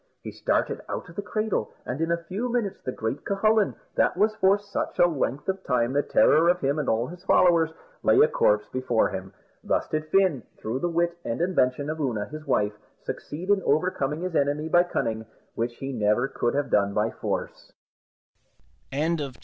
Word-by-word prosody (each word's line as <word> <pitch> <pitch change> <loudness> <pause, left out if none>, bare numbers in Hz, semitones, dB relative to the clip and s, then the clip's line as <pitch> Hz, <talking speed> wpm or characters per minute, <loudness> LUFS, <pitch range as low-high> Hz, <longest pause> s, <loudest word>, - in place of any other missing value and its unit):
He - - -6
started - - -1
out - - -5
of 170 - -13
the 205 - -2
cradle, 215 - -2 0.2
and 140 - -4
in 165 - 0
a 170 0 -1
few 215 +8 -3
minutes 230 -5 -2
the 130 - -2
great 110 +2 -4
Cucullin, 215 +1 +2 0.2
that - - +2
was 215 +3 +3
for 195 +1 +4
such 205 0 -4
a - - +6
length 145 -4 -1
of 190 0 -2
time 125 -1 +1
the 145 - +3
terror 165 +3 +4
of 180 0 +3
him 140 +1 0
and 150 - -1
all 115 +2 +1
his 175 +6 -10
followers, 170 -4 +4 0.3
lay - - +4
a 455 - +7
corpse - - +2
before 130 -3 +1
him. 95 0 -6 0.3
Thus - - 0
did 155 0 -2
Fin, 185 -9 +3 0.2
through 115 +4 -3
the 175 - -1
wit 170 0 0
and 115 - -3
invention 145 -6 +1
of 155 +1 -3
Oonagh, 120 -7 -2
his 155 0 -8
wife, 105 -5 +1 0.3
succeed 170 +6 -6
in 200 -1 +3
overcoming 155 -2 0
his 180 -2 -3
enemy 145 +2 +1
by 175 +2 +5
cunning, 110 -10 -2 0.3
which 120 +1 -2
he 135 +2 -5
never 110 +2 +2
could 120 -2 -1
have 145 -2 -1
done 100 -1 +2
by 110 +2 +1
force. - - -4
155 Hz, 190 wpm, -26 LUFS, 125-185 Hz, 0.3 s, a